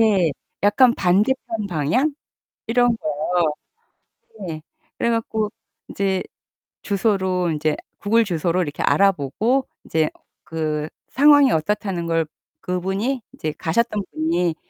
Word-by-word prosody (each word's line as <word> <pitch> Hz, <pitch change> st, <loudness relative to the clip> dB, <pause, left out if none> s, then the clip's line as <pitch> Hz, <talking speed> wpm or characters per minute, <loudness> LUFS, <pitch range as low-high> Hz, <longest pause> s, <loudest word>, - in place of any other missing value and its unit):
예. 195 Hz, -7 st, +4 dB, 0.3 s
약간 235 Hz, +4 st, +5 dB
반대편 215 Hz, +4 st, +1 dB
방향? 175 Hz, -, +1 dB, 0.5 s
이런 240 Hz, 0 st, +3 dB
거. 155 Hz, 0 st, 0 dB, 1.0 s
네. 155 Hz, -1 st, -5 dB, 0.4 s
그래 235 Hz, -, +1 dB
갖고 220 Hz, -2 st, -1 dB, 0.4 s
인제 195 Hz, -1 st, 0 dB, 0.6 s
주소로 190 Hz, -4 st, +1 dB
인제 155 Hz, 0 st, 0 dB, 0.2 s
구글 225 Hz, +3 st, +3 dB
주소로 175 Hz, -1 st, 0 dB
이렇게 150 Hz, -4 st, -3 dB
알아보고 200 Hz, -, +2 dB, 0.2 s
이제 160 Hz, -1 st, +1 dB, 0.3 s
그 155 Hz, -1 st, -2 dB, 0.2 s
상황이 285 Hz, -1 st, +6 dB
어떻다는 180 Hz, 0 st, -1 dB
걸 165 Hz, -1 st, +1 dB, 0.4 s
그분이 190 Hz, +8 st, -1 dB
이제 155 Hz, -1 st, -4 dB
가셨던 210 Hz, +4 st, 0 dB
분이 165 Hz, +1 st, 0 dB
190 Hz, 230 characters per minute, -22 LUFS, 160-225 Hz, 1.0 s, 상황이